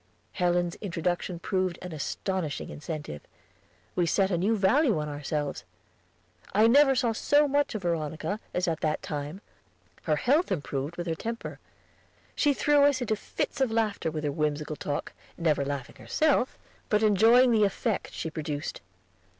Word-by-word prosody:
Helen's 175 -1 +1
introduction 175 -1 -2
proved 185 0 -1
an 180 - -6
astonishing 160 +1 -3
incentive; 150 - -6 0.7
we 175 -1 +2
set 195 +2 +2
a 175 - +2
new 215 +5 +2
value 220 - +3
on 150 - -3
ourselves. 145 0 -3 0.9
I 215 +2 +6
never 270 +3 +6
saw 240 -2 +2
so 290 +6 +3
much 285 -3 +1
of 205 - -4
Veronica 170 +4 -2
as 180 0 -1
at 165 -2 0
that 155 -1 -1
time; 150 +5 -5 0.6
her 155 - +2
health 285 - +2
improved 145 -2 -3
with 175 - -3
her 165 - -1
temper. 230 +7 -5 0.8
She 295 - +3
threw 290 0 +4
us 285 -2 +3
into 220 -3 0
fits 215 - -4
of 265 - +3
laughter 220 -6 0
with 155 -1 -4
her 145 - 0
whimsical 150 0 -1
talk, 145 -1 -4 0.2
never 155 -4 +1
laughing 140 -2 -5
herself, 295 -5 +1 0.3
but 210 0 +2
enjoying 225 +5 +6
the 220 -2 +4
effect 205 +1 -1
she 160 - -5
produced. 150 -1 -4
180 Hz, 155 wpm, -28 LUFS, 155-225 Hz, 0.9 s, I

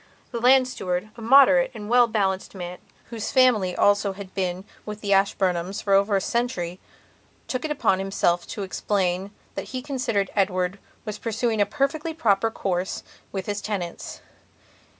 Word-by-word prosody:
The 235 - -3
land 255 +1 +6
steward, 185 -3 -3
a 230 - -11
moderate 265 +2 +6
and 210 -2 -7
well 240 +1 +5
balanced 195 -3 -1
man 180 -1 -6 0.3
whose 225 -2 -4
family 225 -9 +4
also 205 -1 +3
had 190 -1 -10
been 185 0 -2 0.2
with 210 0 -7
the 200 -1 +1
Ashburnhams 190 -1 +1
for 200 - +1
over 200 +1 +4
a - - +3
century, 185 -7 -2 0.7
took 255 - -3
it - - -2
upon 265 -10 +1
himself 175 -3 0
to 205 - -5
explain 190 -1 -1 0.2
that - - -5
he 255 - -5
considered 245 -8 -1
Edward 185 -1 0 0.3
was 215 -1 -5
pursuing 225 -1 0
a 205 - +3
perfectly 300 +3 -1
proper 225 -7 +2
course 185 -4 -2 0.3
with 190 -2 -4
his 205 0 -3
tenants. 190 -6 -5
205 Hz, 160 wpm, -24 LUFS, 190-235 Hz, 0.7 s, land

